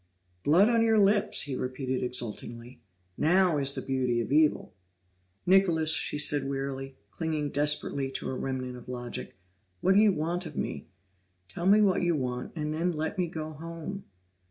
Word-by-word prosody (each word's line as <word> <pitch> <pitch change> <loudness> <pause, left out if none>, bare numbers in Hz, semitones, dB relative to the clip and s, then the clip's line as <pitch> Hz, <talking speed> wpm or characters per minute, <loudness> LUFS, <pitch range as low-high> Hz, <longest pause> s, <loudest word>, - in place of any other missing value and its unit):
"Blood 175 +8 +5
on 230 -1 +3
your 225 -1 +3
lips!" 205 0 +3
he 140 -3 -4
repeated 130 0 -3
exultingly. 120 0 -3 0.4
"Now 175 -1 +3
is 140 0 +3
the - - -4
beauty 130 -3 0
of 115 - -4
evil!" 150 -6 +2 0.7
"Nicholas," 175 -4 +3
she 150 - 0
said 145 -2 +3
wearily, 135 -1 -4 0.2
clinging 155 -1 -3
desperately 145 -2 0
to - - -4
a - - -4
remnant 130 -1 -4
of 125 - -13
logic, 120 -1 -6 0.4
"what 190 - +3
do 200 - +5
you 215 -1 +5
want 175 +1 -2
of - - -11
me? - - -4 0.6
Tell 170 - -4
me 210 +2 +6
what 195 -3 +3
you 175 -1 +1
want 125 -3 -4
and 150 -1 -3
then 170 +3 -1
let 160 +5 -3
me 180 - +1
go 155 -1 -6
home." 165 +5 -7
150 Hz, 170 wpm, -28 LUFS, 130-175 Hz, 0.7 s, me